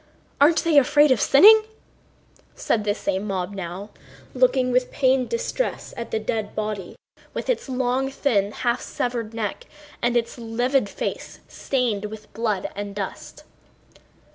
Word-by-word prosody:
Aren't 315 +3 +5
they 320 -3 +6
afraid 290 +2 +4
of 240 -6 +3
sinning?..." 425 +11 +8 0.9
said 215 -2 -1
the 205 -1 +1
same 195 0 -2
mob 190 -1 -3
now, 190 +2 -6 0.4
looking 260 - +2
with 250 0 +1
pained 260 -1 +2
distress 485 +1 -3
at 235 - -6
the - - -1
dead 215 0 -3
body 210 -4 -4 0.4
with - - -1
its 450 - -4
long, 255 +1 0
thin, 220 -8 0
half 240 +2 -1
severed 235 -3 -3
neck 215 -3 -4 0.4
and 240 0 +2
its 235 +1 -3
livid 240 +1 0
face - - -5
stained 235 -6 -1
with 215 0 -9
blood 215 -3 -2
and 200 0 -6
dust. 200 -2 -6
235 Hz, 140 wpm, -23 LUFS, 205-265 Hz, 0.9 s, sinning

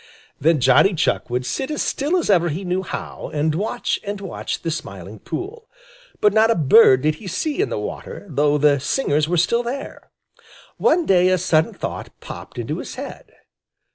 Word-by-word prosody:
Then 160 +1 +3
Johnny 135 - +4
Chuck 155 - 0
would 125 +1 -2
sit 265 - -3
as 300 - -1
still 300 +6 0
as 350 - -1
ever 175 -3 +3
he 175 +6 -4
knew 180 +1 0
how, 185 - -6
and 150 +1 +1
watch 200 +7 -2
and 205 -1 -4
watch 195 -2 -5
the 165 - -1
Smiling 100 - -7
Pool, 445 - -7 0.5
but 210 -1 +3
not 220 +1 +4
a 230 - +3
bird 145 - +6
did 155 0 +2
he 205 - -8
see 305 - -1
in 415 - 0
the - - -3
water, - - -6
though 145 -2 +2
the 145 -1 +3
singers 150 - 0
were 175 - +1
still 235 +8 +2
there. 250 +3 -6 0.7
One 335 +1 +2
day 180 -1 +4
a 185 - +3
sudden 160 -2 +1
thought - - -6
popped - - -10
into - - -3
his - - -7
head. - - -8
180 Hz, 190 wpm, -21 LUFS, 150-225 Hz, 0.7 s, bird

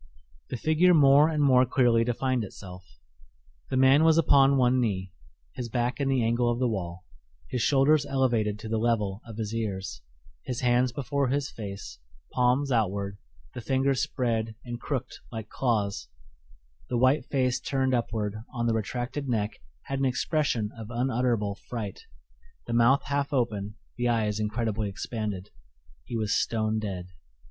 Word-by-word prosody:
The 125 - -3
figure 160 +7 +4
more 145 +1 +6
and 155 -2 +1
more 130 -2 +6
clearly 120 -2 +3
defined 125 +1 0
itself. 90 -2 -10 0.9
The 130 - -1
man 135 +3 +6
was 160 0 +5
upon 140 -3 +5
one 130 0 +3
knee, 95 -6 -1 0.4
his 120 -2 -5
back 120 +3 -1
in 140 -1 0
the 130 -3 +2
angle 120 +1 +2
of 120 - 0
the 125 0 +1
wall, 95 -4 -4 0.4
his 125 - -2
shoulders 140 +4 +4
elevated 120 -6 +1
to 110 - -8
the 110 0 -1
level 110 -3 0
of 110 -2 -9
his 110 -1 -3
ears, 95 - -3 0.4
his 125 -1 -4
hands 125 0 +3
before 140 +2 -1
his 140 +2 -1
face, 100 -3 -8 0.3
palms 130 +3 +2
outward, 100 -3 0 0.3
the 120 - -6
fingers 135 +2 +1
spread 115 -6 -1
and 120 0 -6
crooked 135 -5 -3
like 110 -2 -6
claws; 105 - -1 0.8
the - - 0
white 130 +3 +3
face 130 -2 +1
turned 130 0 0
upward 110 -3 -1 0.2
on 120 -1 -1
the 115 - +2
retracted 125 +5 -3
neck 110 -3 -1 0.2
had 135 0 -3
an 135 - +1
expression 125 -4 0
of 110 -2 -8
unutterable 120 -4 0 0.2
fright, 110 -5 -5 0.6
the 120 - -4
mouth 120 +4 +4
half 140 +1 -1
open, 105 -6 -1 0.2
the 120 0 +1
eyes 110 -3 0
incredibly 105 -1 -1
expanded. 105 -1 -5 0.5
He 115 - -4
was 110 -2 0
stone 110 -1 0
dead. 95 -4 -5
120 Hz, 155 wpm, -27 LUFS, 110-130 Hz, 0.9 s, more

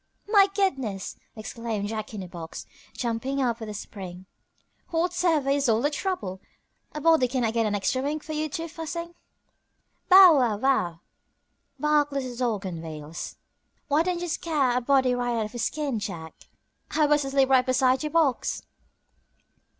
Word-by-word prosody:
"My 405 -2 +6
goodness!" 265 - -1 0.2
exclaimed 220 -2 -4
Jack 215 -1 -4
in 195 - -5
a - - -8
box, 170 -2 -8 0.3
jumping 245 +3 -2
up 240 -3 0
with 220 -2 -6
a 210 - -6
spring, 185 -3 -8 0.6
"whatever 335 -4 +1
is 280 -2 +2
all 220 0 +3
the 290 +5 +1
trouble? 290 - -3 0.5
A 300 - -5
body 320 -4 +4
cannot 245 -3 0
get 230 -1 +1
an 205 - 0
extra 230 +6 0
wink 295 +2 -2
for 310 - -6
you 310 0 -1
two 330 +3 -4
fussing." 335 +1 -6 1.0
"Bow 365 -5 +9
wow 230 -5 +1
wow!" 205 -10 +1 0.8
barked 300 -1 +2
little 260 -3 -3
Dog 230 -5 -1
on 170 -3 -5
wheels, 155 0 -7 0.5
"why 295 +2 +4
don't 350 0 -1
you 350 - -3
scare 300 -7 0
a 250 - +1
body 260 0 +3
right 245 -1 -1
out 220 - 0
of 210 - -8
his 235 -1 -2
skin, 290 -7 -2
Jack? 165 -6 -6 0.6
I 310 - +2
was 295 0 +3
asleep 270 0 +2
right 260 -1 +6
beside 255 0 +2
your 305 - -2
box." 310 -6 +1
260 Hz, 165 wpm, -26 LUFS, 220-305 Hz, 1.0 s, Bow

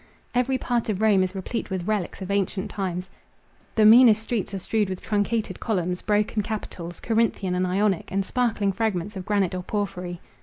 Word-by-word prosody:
Every 250 +2 +2
part 240 -3 -1
of 200 -3 -1
Rome 215 -3 +4
is 185 +1 -1
replete 195 +5 -4
with 185 -2 -3
relics 205 -3 -2
of 190 - -5
ancient 200 +1 -1
times. 185 -2 -3 0.7
The 215 - +5
meanest 220 -1 +8
streets 225 -4 -2
are 195 - -3
strewed 210 +2 0
with 185 -1 -4
truncated 210 -2 -1
columns, 180 -5 -1
broken 210 +1 +1
capitals—Corinthian 205 0 -2
and 180 0 +1
Ionic, 195 0 0
and 195 0 0
sparkling 225 -5 +1
fragments 205 -1 -2
of 185 -1 -6
granite 200 -4 +1
or 180 - -2
porphyry. 180 -3 -3
200 Hz, 175 wpm, -25 LUFS, 185-220 Hz, 0.7 s, meanest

